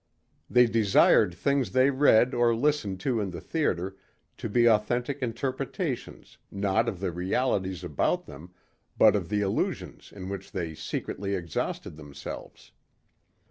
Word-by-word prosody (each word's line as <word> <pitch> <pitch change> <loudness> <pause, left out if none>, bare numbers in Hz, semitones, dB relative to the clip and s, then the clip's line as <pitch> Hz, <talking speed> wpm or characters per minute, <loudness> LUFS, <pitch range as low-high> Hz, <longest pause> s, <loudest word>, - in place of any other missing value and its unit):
They 125 0 +6
desired 105 -4 +4
things 140 +7 0
they 130 +2 +4
read 130 -3 +4
or 120 -1 +3
listened 115 -7 0
to 120 -1 0
in 100 -2 -2
the 85 -1 -7
theater 95 - -2 0.4
to 115 - -5
be 120 +3 +3
authentic 120 +5 +1
interpretations 130 - -4
not 100 +3 0
of 95 - -6
the 95 -2 -2
realities 95 0 -1
about 80 -5 0
them 80 +6 -12 0.5
but - - +6
of - - -2
the 105 0 0
illusions 100 -1 -3
in 95 -2 -8
which 95 -1 -7
they 85 -3 -3
secretly 100 +5 -4
exhausted 85 -3 -4
themselves. 70 -2 -9
105 Hz, 140 wpm, -27 LUFS, 95-125 Hz, 0.5 s, They